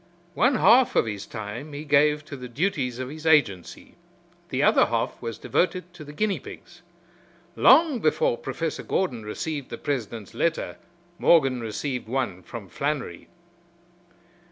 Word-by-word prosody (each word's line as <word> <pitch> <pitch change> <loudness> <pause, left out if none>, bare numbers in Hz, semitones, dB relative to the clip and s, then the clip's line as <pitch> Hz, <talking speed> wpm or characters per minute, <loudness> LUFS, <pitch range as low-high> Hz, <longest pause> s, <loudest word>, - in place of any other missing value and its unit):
One 245 +9 +3
half 240 +5 +5
of - - +4
his 105 -2 -5
time 115 +7 -7
he 145 +1 -6
gave 150 +1 +3
to 150 - -8
the 125 -2 -8
duties 135 -4 -1
of 130 0 -5
his 155 +2 -6
agency; 115 - +1 0.6
the - - 0
other - - +5
half - - -2
was 115 -1 -5
devoted 180 0 -1
to 175 -3 -10
the 145 - -10
guinea 200 +5 -1
pigs. 175 0 -12 0.7
Long 290 0 +5
before 485 - +2
Professor - - -4
Gordon 130 -12 -1
received 140 +6 -5
the - - -6
president's 115 -7 -4
letter 170 -1 -1 0.4
Morgan 135 -7 +4
received 120 +3 -4
one 120 -7 -2
from 110 0 -9
Flannery. 140 - -3
145 Hz, 145 wpm, -25 LUFS, 115-175 Hz, 0.7 s, half